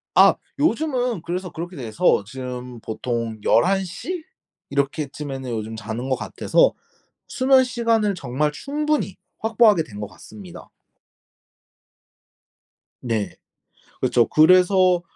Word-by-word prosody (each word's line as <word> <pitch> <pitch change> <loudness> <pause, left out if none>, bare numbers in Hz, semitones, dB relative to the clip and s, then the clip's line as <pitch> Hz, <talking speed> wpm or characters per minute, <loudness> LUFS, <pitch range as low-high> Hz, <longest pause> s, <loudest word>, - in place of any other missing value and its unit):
아. - - +7 0.2
요즘은 250 - 0
그래서 180 +2 -4
그렇게 175 +2 -7
돼서 110 -6 +1
지금 125 -1 -7
보통 115 0 -3
11 195 +2 +3
시 315 - -5 0.5
이렇게쯤에는 140 -1 -3
요즘 110 -1 -4
자는 110 +4 -5
것 130 - +2
같아서 - - +2 0.5
수면 260 0 +4
시간을 230 -4 +1
정말 150 0 -1
충분히 295 - -2 0.2
확보하게 220 -5 +4
된 105 -8 -11
것 105 - -4
같습니다. 100 -5 -12 2.3
네. 115 -4 -2 0.7
그쵸. 120 - +3
그래서 180 +2 +5
155 Hz, 225 characters per minute, -22 LUFS, -, 2.3 s, 아